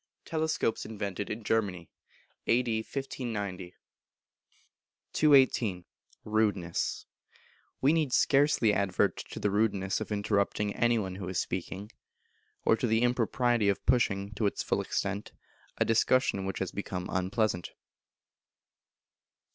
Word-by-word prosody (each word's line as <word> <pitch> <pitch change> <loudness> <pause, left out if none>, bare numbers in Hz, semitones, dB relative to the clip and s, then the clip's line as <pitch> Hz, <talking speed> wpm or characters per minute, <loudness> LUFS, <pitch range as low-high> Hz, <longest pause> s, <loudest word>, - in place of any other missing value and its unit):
[TELESCOPES 160 -7 -1
INVENTED 100 -2 -4
IN 110 +1 -5
GERMANY 100 -6 -1 0.6
A.D. 115 -2 +2
1590.] 105 -8 -5 1.4
218. 130 - +4 0.4
Rudeness. 105 -6 0 0.8
We 140 +4 +4
need 155 -5 +1
scarcely 135 -5 +4
advert 100 -2 +1
to - - -7
the 105 - 0
rudeness 100 -2 +1
of 110 - -5
interrupting 100 0 0
any 120 0 +3
one 95 -3 -3
who 90 -2 -5
is 95 - -1
speaking, 95 +3 -4 0.7
or - - +5
to 125 - 0
the 110 +1 +2
impropriety 120 -2 +2
of 100 - -1
pushing, 100 -4 +1
to 105 0 0
its - - -2
full - - 0
extent, 100 +1 -3 0.4
a - - +2
discussion 115 -3 +2
which 95 - -3
has - - -3
become 90 -1 -4
unpleasant. 95 0 -1
105 Hz, 115 wpm, -30 LUFS, 95-120 Hz, 1.4 s, or